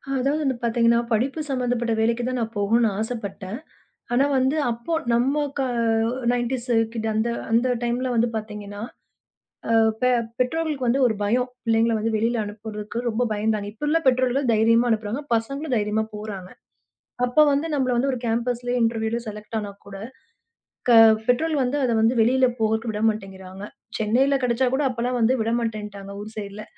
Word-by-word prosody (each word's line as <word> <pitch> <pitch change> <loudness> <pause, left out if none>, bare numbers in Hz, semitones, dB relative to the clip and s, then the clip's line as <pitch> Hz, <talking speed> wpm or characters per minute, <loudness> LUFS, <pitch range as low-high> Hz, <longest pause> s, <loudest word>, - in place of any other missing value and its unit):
அதாவது 275 +4 +1
வந்து 265 -3 0
பாத்தீங்கன்னா, 235 0 +3
படிப்பு 260 +8 0
சம்பந்தப்பட்ட 245 -3 0
வேலைக்குத்தான் 240 +3 0
நான் 225 0 -4
போகணும்னு 225 +3 +3
ஆசைப்பட்டேன். 220 -1 -5 0.5
ஆனா 265 +3 +4
வந்து 265 +4 +1
அப்போ 235 +8 -5 0.2
நம்ம 270 +5 +2 0.2
க - - +1 0.7
90'ஸ் 245 +1 -2 0.2
கிட்! 225 -1 -3
அந்த 220 +2 +1 0.2
அந்த 235 +3 +3
டைம்ல 245 +2 -1
வந்து 235 +1 +2
பாத்தீங்கன்னா, 210 -1 -6 0.9
அ - - +3 0.3
பெ 250 - +3 0.3
பெற்றோர்களுக்கு 290 0 -1
வந்து 260 +4 +2
ஒரு 220 - -1
பயம். 245 +5 +1 0.2
பிள்ளைங்கள 225 0 +3
வந்து 220 +1 -1
வெளியில 230 +1 0
அனுப்புறதுக்கு 210 +1 -7
ரொம்ப 230 +2 -1
பயந்தாங்க. 210 -1 -1
இப்போ 220 +7 -7
உள்ள 320 +2 +3
பெற்றோர்கள் 255 0 +2
தைரியமா 230 +2 +4
அனுப்புறாங்க. 220 +4 -1
பசங்களும் 275 +5 -2
தைரியமா 210 +1 0
போறாங்க. 205 -3 -7 0.8
அப்ப 245 +5 +2
வந்து, 285 +3 0
நம்மள 260 -3 +1
வந்து 270 +3 +1
ஒரு 255 - -2
கேம்பஸ்லயே 245 +2 -1
இன்டெர்வியூல 225 0 0
செலெக்ட் 210 +1 -7
ஆனாக்கூட 200 -1 -8 1.3
பெற்றோர்கள் 290 +3 +2
வந்து, 255 +4 -1
அத 245 - +1
வந்து 230 +3 +3
வெளியில 255 +3 +4
போகதுக்கு 220 +1 0
விட 210 0 -4
மாட்டேங்கிறாங்க. 195 -2 -7 0.4
சென்னைல 260 +6 +2
கெடைச்சாக்கூட 255 +3 +1
அப்பல்லாம் 245 +1 -2
வந்து 235 +3 +3
விடமாட்டேன்டாங்க 215 -3 -3
ஊர் 215 +1 -9
சைடுல. 205 0 -6
230 Hz, 145 wpm, -23 LUFS, 215-250 Hz, 1.3 s, ஆனா